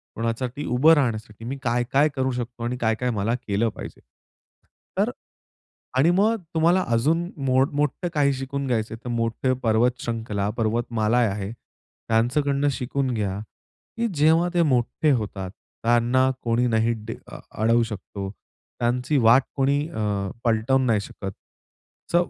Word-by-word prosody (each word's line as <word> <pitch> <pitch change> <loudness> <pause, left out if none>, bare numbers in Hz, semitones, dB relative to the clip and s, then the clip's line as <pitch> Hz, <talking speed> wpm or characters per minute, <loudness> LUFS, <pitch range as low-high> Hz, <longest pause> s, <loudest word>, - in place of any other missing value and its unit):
कोणासाठी 120 +5 -3
उभं 140 +7 +5
राहण्यासाठी 115 -6 -1
मी 135 +3 -4
काय-काय 125 +5 +2
करू 130 0 0
शकतो 120 -1 -5
आणि 125 +1 -2
काय-काय 115 +2 +1
मला 115 +4 +1
केलं 105 +3 +1
पाहिजे. - - -9 1.0
तर - - +2 0.9
आणि 155 +6 +5
मग 210 +3 +2
तुम्हाला 170 +4 +4
अजून 165 +9 +1 0.2
मोड 130 +1 +3
मोठं 150 +4 0
काही 140 -2 +3
शिकून 135 +1 -4
घ्यायचं 110 -3 -1
आहे, - - -14
तर - - -3
मोठे 115 +3 0
पर्वत 115 +2 +3
श्रृंखला, 110 -3 -2
पर्वतमाला 115 0 0
आहे. 105 -3 0 0.6
त्यांच्याकडनं 140 +5 +1
शिकून 130 +1 -2
घ्या. 100 -3 -2 0.6
की 235 0 +1
जेव्हा 160 +4 +4
ते 175 - +3
मोठे 140 +2 +2
होतात, 100 -6 -2 0.3
त्यांना 120 +3 +3
कोणी 120 +1 +2
नाही 115 0 +2
ड 115 - -3
अ - - -9 0.2
अडवू 115 +1 +4
शकतो. 100 -3 -6 0.5
त्यांची 125 +4 +1
वाट 120 +2 +6
कोणी 140 +1 +2
अ, 105 - -2 0.2
पलटवून 120 +4 +2
नाही 110 -3 +3
शकत. 100 -1 -7 0.8
अस - - +3
120 Hz, 140 wpm, -24 LUFS, 110-140 Hz, 1.0 s, वाट